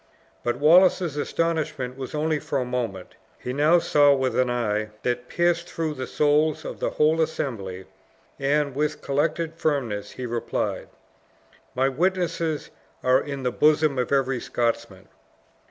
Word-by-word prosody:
But 120 0 -1
Wallace's 170 +2 +5
astonishment 150 -4 -2
was 135 +2 -6
only 155 0 0
for 140 - -3
a 130 - -1
moment; 115 -7 -4 0.2
he 125 - -5
now 150 +5 +4
saw 145 -4 +4
with 130 -1 -1
an 130 -1 +2
eye 110 -3 -1
that 125 0 -1
pierced 170 0 0
through 160 -2 -2
the 130 -3 -5
souls 150 +1 +2
of - - -6
the - - 0
whole 155 +2 +2
assembly, 100 -12 -3 0.5
and, 140 0 +1
with 150 +2 -2
collected 155 +3 0
firmness, 135 -11 -2
he 130 - -6
replied; 120 -1 -2 0.9
"My 130 +1 +2
witnesses 165 +1 -1 0.3
are 130 +1 +4
in 140 -2 -6
the 125 - 0
bosom 150 0 +3
of 125 - -1
every 135 -2 +1
Scotsman." 120 -1 -2
140 Hz, 145 wpm, -24 LUFS, 125-155 Hz, 0.9 s, Wallace's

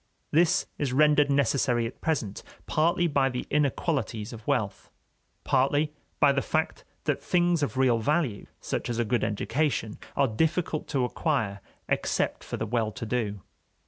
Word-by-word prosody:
This 165 +2 +3
is 140 -4 -1
rendered 150 0 +4
necessary 140 -3 +2
at 115 - -7
present, 115 -11 -1 0.2
partly 170 +3 +2
by 140 -4 +2
the 125 -1 -4
inequalities 135 -6 0
of 115 -2 -11
wealth, - - -1 0.5
partly 145 +3 +2 0.3
by 145 - +6
the 135 0 +1
fact - - -1 0.2
that - - 0
things 175 -2 +2
of 140 -2 -1
real 125 -3 +3
value, 140 -3 0
such - - -3
as 120 - -2
a 120 - +1
good 120 +2 0
education, 115 +1 -1 0.2
are 140 - +3
difficult 155 +6 0
to 135 -4 +1
acquire, 125 - -1 0.3
except - - 0
for - - -5
the 110 - -2
well 110 -1 0
to 110 - -6
do. 105 -4 -2
135 Hz, 155 wpm, -27 LUFS, 115-150 Hz, 0.5 s, by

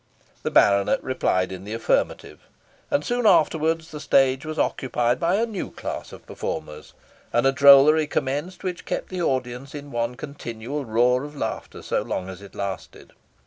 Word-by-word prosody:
The - - -2
baronet 100 -1 +3
replied 95 -8 0
in 95 0 -7
the 105 +3 -5
affirmative, 115 - -1 0.5
and 145 - 0
soon 245 -2 +1
afterwards 160 -1 +2
the 150 - -7
stage 135 0 +2
was 155 0 -5
occupied 125 -2 0
by 170 +2 +2
a 225 +3 +2
new 215 -5 -5
class - - -6
of - - -13
performers, 75 0 -6 0.4
and 120 +2 +2
a 135 - +5
drollery 140 +3 +7
commenced 145 +8 -3
which 180 -2 -4
kept - - -3
the 185 -1 -4
audience 130 -1 -2
in 145 -1 -8
one 120 +1 -2
continual 135 0 -6
roar 125 +3 +2
of 145 +1 -9
laughter 140 - -5
so - - 0
long 90 - -4
as 95 0 -9
it 100 - -13
lasted. 100 -2 -6
135 Hz, 170 wpm, -24 LUFS, 115-155 Hz, 0.5 s, drollery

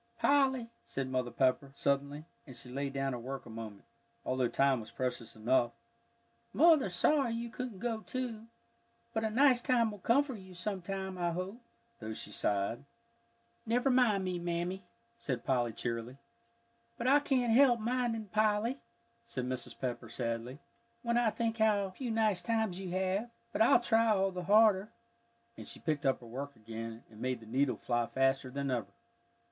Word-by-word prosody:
"Polly," 265 -4 +2
said 135 -1 -4
Mother 130 -1 0
Pepper, 130 +2 +1
suddenly, 140 +2 -1 0.2
and 130 - -10
she 125 - -9
laid 140 +1 -3
down 135 -1 -1
her 120 - -4
work 135 +3 -6
a 120 - -10
moment, 110 -3 -8 0.4
although 130 -1 +1
time 135 +1 +2
was 110 - -9
precious 125 -3 -4
enough, 120 +2 +2 0.8
"Mother's 310 - +5
sorry 265 +3 +3
you 235 0 -4
couldn't 250 -5 -5
go, 230 +2 -2
too. 230 -1 -5 0.7
But 220 - 0
a 220 - +1
nice 250 +2 +4
time 235 -3 +2
will 205 - -9
come 240 +9 +4
for 280 -2 -6
you 190 -4 -11
sometime, 190 0 -4
I 175 -1 0
hope," 190 +7 -5 0.4
though 110 -1 -5
she 105 - -7
sighed. 105 +4 -1 0.8
"Never 245 +4 +2
mind 235 -6 +4
me, 180 -1 -2
Mammy," 175 +2 -2 0.3
said 130 - -4
Polly, 120 -3 +1
cheerily. 115 +3 -4 0.8
"But 235 - -4
I 275 +3 +6
can't 255 -5 +1
help 245 -1 +6
minding, 235 -1 -1
Polly," 215 +5 +1 0.5
said 130 - -3
Mrs. 125 -1 -5
Pepper, 125 -2 -3
sadly, 115 +2 -3 0.5
"when 235 -1 +1
I 240 -2 +4
think 230 0 -2
how 205 -3 +3
few 245 +6 -5
nice 215 -5 +2
times 220 -1 0
you 190 -2 -5
have. 190 +5 -1 0.2
But - - 0
I'll 225 - +7
try 230 -1 +3
all 195 -3 +3
the 180 -1 -5
harder." 210 0 +5 0.7
And - - -8
she - - -6
picked 155 -3 -1
up 135 - +1
her - - -11
work 135 +4 -6
again, 115 +1 -7
and 110 0 -13
made 130 -1 -1
the 115 - -13
needle 130 +4 +1
fly 120 -1 0
faster 135 0 +1
than 140 +1 -2
ever. 120 -3 -1
185 Hz, 175 wpm, -33 LUFS, -, 0.8 s, I'll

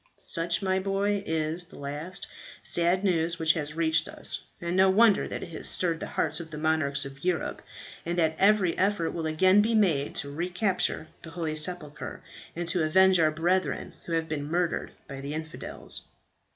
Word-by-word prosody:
"Such, 170 +2 -1
my 190 0 +1
boy, 200 +1 0
is 160 +2 0
the - - -13
last 150 +6 -4 0.4
sad 175 +3 +2
news 170 -3 +1
which 160 -1 +4
has 150 -1 -4
reached 160 -1 +1
us; - - -4 0.2
and 170 0 -3
no 190 0 +5
wonder 210 +1 +5
that - - -5
it - - -8
has 165 - -4
stirred 170 -3 0
the - - -5
hearts 155 0 +1
of 165 -1 -7
the 155 - -7
monarchs 150 -3 +1
of 140 +1 -10
Europe, 180 -2 -1 0.4
and 170 +1 -3
that 160 -2 +2
every 195 -3 +4
effort 190 -4 +1
will 165 -1 -4
be - - 0
again 185 +6 +5 0.2
made 155 -9 +1
to 140 - -2
recapture 180 +1 -1
the 165 - -10
holy 165 -2 -3
sepulchre, 155 -1 -2 0.3
and 175 0 -3
to 175 +1 +2
avenge 190 +3 +5
our 155 -1 +5
brethren 175 +4 0
who 170 - -3
have 165 -1 0
been 150 -2 -4
murdered 175 +1 0 0.2
by 135 0 -7
the 140 +2 -4
infidels." 160 0 -4
165 Hz, 185 wpm, -28 LUFS, 155-185 Hz, 0.4 s, no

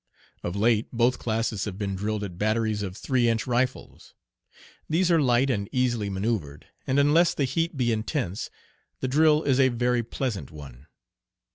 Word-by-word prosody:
Of 85 - -4
late 110 +1 +2
both 120 +1 +1
classes 110 -2 -1
have 100 -3 -5
been 100 -2 -3
drilled 105 +2 -2
at 90 -3 -7
batteries 110 0 0
of 95 -1 -5
three 125 -2 +1
inch 115 0 0
rifles. 125 +1 -3 0.7
These 175 +3 +2
are 165 -2 +4
light 130 0 +3
and 100 -4 -2
easily 120 -5 0
manoeuvred, 95 -8 -3 0.2
and 135 - +1
unless 150 +5 +4
the 145 - 0
heat 165 +4 -2
be 120 -2 +1
intense 110 - -2 0.5
the 130 - 0
drill 155 +3 +4
is 135 -2 +2
a 130 -1 +5
very 120 0 +1
pleasant 115 - -4
one. 70 -2 -12
115 Hz, 165 wpm, -26 LUFS, 100-130 Hz, 0.7 s, a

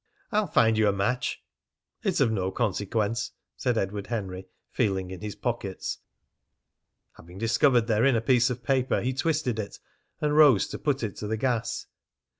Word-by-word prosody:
"I'll 210 -2 +2
find 110 -7 +3
you 110 - +4
a - - +4
match." 125 +6 -1 0.6
"It's - - 0
of 115 - +3
no 95 -4 0
consequence," 105 +1 -1 0.2
said 125 -3 0
Edward 100 0 -2
Henry, 95 -5 -4 0.2
feeling 95 -5 0
in 90 -2 -8
his 105 -1 -5
pockets. 115 -6 -3 1.2
Having 90 +2 -13
discovered 115 +3 +3
therein 115 +4 +3
a - - +3
piece 125 +1 +3
of 125 -1 -5
paper, 130 +1 +1
he 130 +2 -1
twisted 140 -5 0
it 100 - -5 0.4
and 150 0 0
rose 145 -9 +6
to - - -6
put 140 -4 0
it 105 - -3
to 105 - -5
the 110 +1 -1
gas. 120 -1 -1
115 Hz, 165 wpm, -27 LUFS, 100-125 Hz, 1.2 s, rose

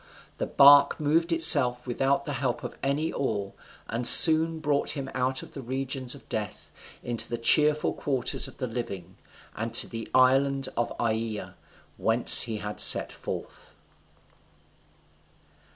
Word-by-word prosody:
The - - -4
bark 140 0 +4
moved 160 +3 -2
of - - 0
itself 130 -7 +4
without 135 +3 -3
the 145 - -6
help 130 -3 -5
of - - -9
any 145 +4 -4
oar, 100 -7 -5 0.3
and 120 +1 -2
soon 160 0 +6
brought 145 -1 -3
him 135 -1 -8
out 130 0 -4
of - - -16
the 140 - -9
regions 130 +1 -5
of 140 - -18
death 105 -1 -8 0.3
into 120 -2 -1
the 120 - -5
cheerful 150 +5 0
quarters 130 -4 -2
of - - -16
the 130 - -6
living, 115 -7 -9 0.4
and 115 +1 -6
to - - +4
the 115 -1 -10
island 135 +1 0
of 120 - -4
Aeaea, 110 -2 -5 0.4
whence 115 +2 +6
he 110 - -5
had 105 0 -9
set - - +5
forth. - - -11
130 Hz, 150 wpm, -24 LUFS, 115-140 Hz, 0.4 s, soon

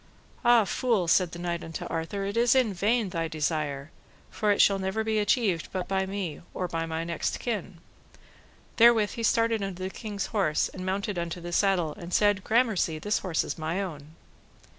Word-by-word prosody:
Ah, 240 -3 +5
fool, 215 -2 0
said 175 0 +3
the 170 - -7
knight 170 -1 -3
unto 165 0 -6
Arthur, 170 +5 -3
it 200 +2 -3
is 240 +1 +4
in 250 -6 +3
vain 210 +3 +1
thy 165 -2 -2
desire, 155 -2 -2 0.4
for 215 - -1
it 205 - +3
shall 195 -1 +5
never 190 +3 -1
be 220 -1 0
achieved 205 -5 +1
but 185 -1 -3
by 190 0 0
me, 190 -6 -4
or 180 - -2
my 165 0 -2
next 170 -1 -2
kin. 200 -6 -4 1.0
Therewith 230 -3 +6
he 230 - -6
started 230 -1 +2
unto 190 -2 -4
the 190 - -3
king's 205 -2 -4
horse 190 -8 +1
and 185 - -8
mounted 195 0 -2
into 170 +1 -4
the 175 0 -7
saddle, 180 -6 +2
and 175 +1 -4
said, 205 -2 +3
Gramercy, 220 -8 +1
this 210 +7 0
horse 175 -5 -1
is - - -5
my 160 +4 -2
own. 155 -5 -6
190 Hz, 185 wpm, -27 LUFS, 170-210 Hz, 1.0 s, Therewith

